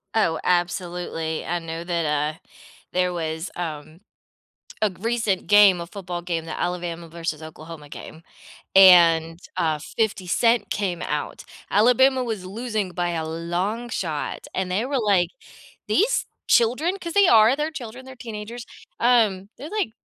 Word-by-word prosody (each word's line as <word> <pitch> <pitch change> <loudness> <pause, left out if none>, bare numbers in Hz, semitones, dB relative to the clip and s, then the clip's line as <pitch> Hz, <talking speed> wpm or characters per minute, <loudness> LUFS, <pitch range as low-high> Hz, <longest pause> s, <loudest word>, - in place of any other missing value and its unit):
Oh, 165 -7 +2
absolutely. 175 -2 -1
I 175 - -1
know 165 0 -6
that, 170 -2 -1
uh, 150 +1 -1 0.5
there 180 0 +1
was, 160 0 -3
um, 160 0 -6 0.8
a 215 -2 +2
recent 225 -3 -1
game, 205 -4 +6
a 170 - -6
football 180 -2 -6
game, 170 -2 -3
the 165 - -6
Alabama 175 -1 -3
versus 165 -2 -4
Oklahoma 155 -1 -10
game, 160 - -10 0.5
and, 170 -3 +7 0.2
uh, 155 -2 0
50 200 +2 -2
Cent 230 +3 +2
came 185 -4 -2
out. 150 0 -4 0.3
Alabama 255 +5 +4
was 220 -6 -4
losing 215 -1 -3
by 175 0 -1
a 165 -2 -2
long 175 +9 -3
shot, 160 -9 -4
and 190 -1 -2
they 195 +5 0
were 275 0 -1
like, 195 -6 +2 0.6
"These 455 +5 +2 0.2
children" 265 +11 +3
'cause 340 -2 -5
they 405 +1 +5
are, 225 0 +6
they're 300 +1 -1
children, 255 -4 -8
they're 260 0 -11
teenagers. 230 0 -7 0.4
Um, 220 -6 +3
they 290 - -8
like, 415 - -1
185 Hz, 145 wpm, -23 LUFS, 165-230 Hz, 0.8 s, and